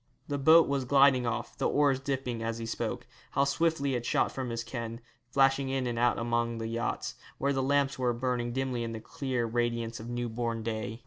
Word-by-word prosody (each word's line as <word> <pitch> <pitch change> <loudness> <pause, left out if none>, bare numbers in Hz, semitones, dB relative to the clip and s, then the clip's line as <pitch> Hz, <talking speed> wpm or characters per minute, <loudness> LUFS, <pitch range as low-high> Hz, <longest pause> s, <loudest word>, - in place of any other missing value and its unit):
The 145 -1 -2
boat 160 +4 +7
was 140 -1 0
gliding 135 -2 +5
off, 115 - -3
the - - +2
oars 140 -3 +3
dipping, 135 -4 -3
as 115 0 -2
he 115 - -5
spoke. 115 - -3 0.3
How 140 - +3
swiftly 140 -1 +1
it 120 -2 -1
shot - - +1
from 130 -2 -4
his 115 0 -3
ken, 115 -2 -5 0.3
flashing 135 +1 +3
in 135 -1 -1
and 120 -1 -2
out 120 0 +3
among 120 0 0
the 115 - -4
yachts, 115 +2 -2 0.2
where 140 +1 +1
the 135 - 0
lamps 140 0 +1
were 125 -1 +2
burning 120 0 -1
dimly 130 -1 -1
in 115 0 -4
that 110 -1 -7
clear 130 -4 -2
radiance 115 0 -1
of 115 +2 -7
new 120 0 -2
born 115 0 -3
day. 110 0 -3
120 Hz, 210 wpm, -30 LUFS, 115-135 Hz, 0.3 s, boat